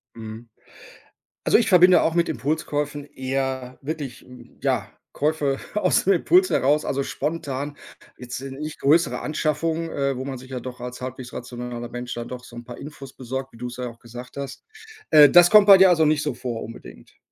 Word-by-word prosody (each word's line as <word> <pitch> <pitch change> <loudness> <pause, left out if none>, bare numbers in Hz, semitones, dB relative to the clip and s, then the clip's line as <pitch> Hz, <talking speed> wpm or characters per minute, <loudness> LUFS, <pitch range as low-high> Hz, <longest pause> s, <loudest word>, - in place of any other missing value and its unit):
Mhm. 110 +1 -9 1.0
Also, - - +5
ich 235 - +1
verbinde 180 -1 +6
auch 160 - +1
mit 170 0 +2
Impulskäufen 145 +2 -2
eher 130 -2 -4
wirklich, 145 -4 -5
hm, 125 -1 -16
ja, - - 0 0.2
Käufe 145 -2 0 0.2
aus 195 -3 +2
dem 195 - +4
Impuls 360 - +3
heraus. 145 +3 +2
Also, 140 0 -1
spontan, 145 -1 -4 0.4
jetzt, 125 0 -6
äh, 135 0 -7
nicht 150 +3 -7
größere 160 +5 +3
Anschaffung, 160 +2 -1
äh, 140 -2 -1
wo 130 - -5
man 135 -1 -5
sich 130 +1 -13
ja 130 -1 -4
doch 125 0 -8
als 125 0 -7
halbwegs 130 0 -7
rationaler 120 -1 -6
Mensch 125 +1 -6
dann 120 0 -6
doch 125 0 -8
so 120 - -14
'n 120 - -8
paar 120 0 -10
Infos 140 -3 -10
besorgt, 130 +1 -6
wie - - -15
du 125 - -5
es 120 0 -8
ja 125 -1 -3
auch 115 -1 -12
gesagt 120 +3 -11
hast. 140 -1 -7 0.5
Äh, 150 -1 +9
das 175 0 +7
kommt 210 -2 +7
bei 200 -2 +9
dir 190 0 +7
also 165 -3 +4
nicht 150 -1 +2
so 150 -4 -2
vor, 120 -2 -5
unbedingt? 115 - -12
135 Hz, 200 wpm, -23 LUFS, 125-155 Hz, 1.0 s, Äh